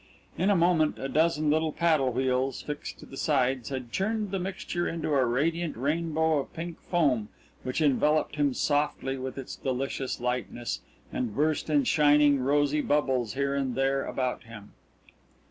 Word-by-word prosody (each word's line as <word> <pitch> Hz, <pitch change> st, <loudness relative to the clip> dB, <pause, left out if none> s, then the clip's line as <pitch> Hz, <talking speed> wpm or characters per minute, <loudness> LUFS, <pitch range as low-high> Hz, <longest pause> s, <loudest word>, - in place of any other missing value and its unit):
In 190 Hz, +4 st, +1 dB
a 205 Hz, -, +4 dB
moment 170 Hz, -3 st, +3 dB
a 135 Hz, -, -4 dB
dozen 155 Hz, 0 st, +2 dB
little 160 Hz, +1 st, +1 dB
paddle 155 Hz, -5 st, +2 dB
wheels, 130 Hz, +1 st, 0 dB
fixed 150 Hz, -1 st, -6 dB
to -, -, -12 dB
the 135 Hz, -, -11 dB
sides, 130 Hz, -5 st, +1 dB
had 130 Hz, -3 st, -5 dB
churned 210 Hz, -, -1 dB
the 195 Hz, -, -1 dB
mixture 180 Hz, -1 st, -3 dB
into 165 Hz, -2 st, -3 dB
a 135 Hz, -2 st, +4 dB
radiant 160 Hz, +6 st, 0 dB
rainbow 160 Hz, +3 st, +1 dB
of 135 Hz, -, -5 dB
pink 165 Hz, 0 st, -6 dB
foam 135 Hz, -, +2 dB, 0.3 s
which 130 Hz, +5 st, -2 dB
enveloped 150 Hz, +1 st, +2 dB
him 145 Hz, -3 st, +1 dB
softly 145 Hz, -2 st, 0 dB
with 130 Hz, 0 st, -6 dB
its 135 Hz, -, -6 dB
delicious 130 Hz, 0 st, -3 dB
lightness, 125 Hz, -1 st, -3 dB, 0.3 s
and 115 Hz, -5 st, -2 dB
burst 155 Hz, +2 st, 0 dB
in 290 Hz, -1 st, +3 dB
shining, 150 Hz, -, +4 dB
rosy 145 Hz, +3 st, +2 dB
bubbles 130 Hz, -7 st, 0 dB
here 140 Hz, 0 st, 0 dB
and 135 Hz, -3 st, -1 dB
there 135 Hz, +1 st, +1 dB
about 130 Hz, -1 st, -2 dB
him. 105 Hz, -3 st, -11 dB
145 Hz, 165 wpm, -28 LUFS, 130-160 Hz, 0.3 s, a